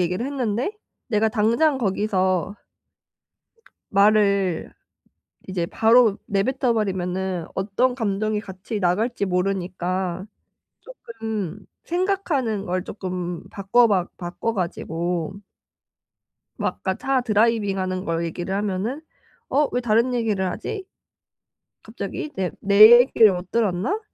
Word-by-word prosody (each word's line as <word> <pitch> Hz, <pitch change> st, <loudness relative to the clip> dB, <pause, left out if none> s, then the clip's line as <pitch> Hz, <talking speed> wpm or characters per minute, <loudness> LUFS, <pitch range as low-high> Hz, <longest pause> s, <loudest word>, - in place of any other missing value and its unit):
얘기를 180 Hz, +6 st, -1 dB
했는데 255 Hz, -, -2 dB, 0.4 s
내가 220 Hz, -1 st, +2 dB
당장 235 Hz, +7 st, +2 dB
거기서 190 Hz, -3 st, 0 dB, 1.4 s
말을 200 Hz, -3 st, +3 dB, 0.8 s
이제 175 Hz, -3 st, -2 dB
바로 225 Hz, -2 st, +4 dB
내뱉어 240 Hz, +5 st, 0 dB
버리면은 185 Hz, -4 st, -2 dB
어떤 210 Hz, +6 st, 0 dB
감정이 215 Hz, -2 st, -1 dB
같이 200 Hz, +1 st, -6 dB
나갈지 205 Hz, +5 st, 0 dB
모르니까 185 Hz, -1 st, -2 dB, 0.5 s
쪼끔 220 Hz, -, -6 dB, 0.2 s
생각하는 335 Hz, -, -1 dB
걸 185 Hz, 0 st, -2 dB
쪼끔 180 Hz, -4 st, -5 dB
바꿔박 200 Hz, -2 st, +2 dB
바꿔 180 Hz, +6 st, -3 dB
가지고 175 Hz, 0 st, -3 dB, 1.2 s
막 -, -, -1 dB
아까 190 Hz, -1 st, -1 dB
차 265 Hz, +2 st, 0 dB
드라이빙하는 205 Hz, -5 st, +1 dB
걸 165 Hz, 0 st, -1 dB
얘기를 175 Hz, +3 st, -4 dB
하면은 205 Hz, +7 st, -2 dB, 0.5 s
"어 290 Hz, +2 st, +2 dB
왜 245 Hz, -, 0 dB
다른 235 Hz, +2 st, +2 dB
얘기를 210 Hz, -6 st, 0 dB
하지? 395 Hz, -, -5 dB, 1.0 s
갑자기 325 Hz, -5 st, -6 dB
내 185 Hz, -2 st, -1 dB
내 215 Hz, +4 st, +8 dB
얘기를 225 Hz, -5 st, +4 dB
못 180 Hz, 0 st, -6 dB
들었나?" 230 Hz, -, 0 dB
200 Hz, 235 characters per minute, -23 LUFS, 185-235 Hz, 1.4 s, 내